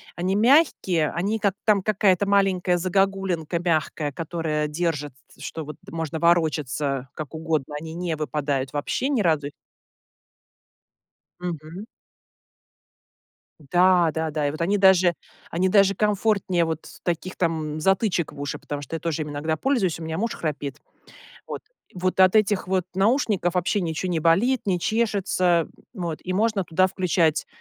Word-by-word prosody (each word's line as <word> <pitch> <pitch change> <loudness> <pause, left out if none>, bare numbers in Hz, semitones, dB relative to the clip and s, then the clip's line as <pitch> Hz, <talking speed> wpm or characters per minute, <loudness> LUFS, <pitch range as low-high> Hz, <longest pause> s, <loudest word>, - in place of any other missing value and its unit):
они 185 +3 -1
мягкие, 215 - +3
они 205 +6 -1
как 200 -2 +1
там 210 -3 +4
какая-то 200 -1 +2
маленькая 190 -3 +2
загогулинка 185 -2 0
мягкая, 155 -3 -1
которая 155 -1 -2
держит 150 -3 -2 0.2
с - - -17
что 160 -2 -5
вот 150 -1 -8
можно 160 -1 -4
ворочаться 150 -5 +1
как 155 -1 -7
угодно, 155 -3 -2
они 160 +1 -8
не 175 -2 -2
выпадают 145 -3 -2
вообще 195 - -1
ни 255 -7 +1
разу 150 -5 +1 1.9
Мгм. 175 +3 -6 1.7
Да-да-да, 160 -2 +2
и - - +1
вот 155 - -8
они 195 +5 +2
даже 190 -3 +5 0.4
они 185 +3 +1
даже 195 -1 +5
комфортнее 205 -4 +1
вот 160 -1 -4 0.2
таких 175 +2 -3
там 155 -3 -1
затычек 190 -2 +1
в 145 - -11
уши, 145 - -4
потому 145 -1 -6
что 165 - -5
я - - -7
тоже 165 -2 -2
ими 150 - -6
иногда 155 +2 -2
пользуюсь, 205 - 0
у - - -8
меня 160 +1 -4
муж 230 +2 -1
храпит. 145 -3 -4 0.7
Вот, - - -5 0.3
вот 185 +1 -1
от 185 +2 +6
этих 205 -2 +2
вот 185 -1 +1
наушников 195 -3 +1
вообще 190 +3 +1
ничего 170 +2 -2
не 165 - 0
болит, 200 +11 +3
не 180 -3 +1
чешется, 190 -6 +1 0.3
м, 180 - -5
вот, 165 -2 -3
и 185 - -4
можно 210 -1 +1
туда 180 +3 +2
включать 175 -4 +1
175 Hz, 150 wpm, -24 LUFS, 155-195 Hz, 1.9 s, от